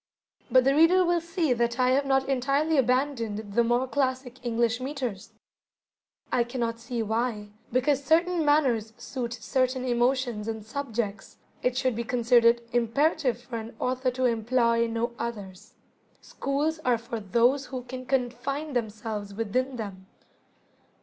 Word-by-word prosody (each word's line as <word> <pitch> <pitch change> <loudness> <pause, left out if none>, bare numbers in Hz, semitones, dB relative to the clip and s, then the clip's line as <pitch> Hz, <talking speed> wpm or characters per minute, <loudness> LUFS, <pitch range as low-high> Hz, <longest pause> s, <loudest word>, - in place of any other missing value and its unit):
But 255 -1 +5
the 270 +2 +3
reader 340 +5 +5
will 345 -1 +2
see 335 -4 0
that 235 +1 -1
I 255 0 +4
have 275 +1 +2
not 270 0 +2
entirely 275 +4 +1
abandoned 235 -5 0
the 235 - +4
more 240 +2 +1
classic 260 -2 -2
English 235 0 +1
metres. 255 -8 -4 1.0
I 240 - +3
cannot 235 -1 -3
see 235 0 -3
why, 220 -1 -2 0.2
because 270 +3 +2
certain 335 +4 +2
manners 260 -7 +2
suit 245 -3 -5
certain 255 +1 -1
emotions 240 -2 0
and 220 -2 -4
subjects, 225 -5 -4 0.2
it 250 0 0
should 255 -3 +1
be 235 - -2
considered 235 0 +3
imperative 245 +1 +1
for 235 - -5
an 225 +1 -9
author 255 0 0
to 255 +1 -1
employ 235 0 +2
no 230 +1 -2
others. 210 -4 -6 0.4
Schools 295 +3 -2
are 250 -6 +2
for 230 0 -6
those 240 +7 +2
who 255 -2 -5
can 255 +1 -8
confine 270 +3 -2
themselves 215 -3 -4
within 250 +5 -1
them. 195 -5 -7
245 Hz, 145 wpm, -27 LUFS, 230-270 Hz, 1.0 s, But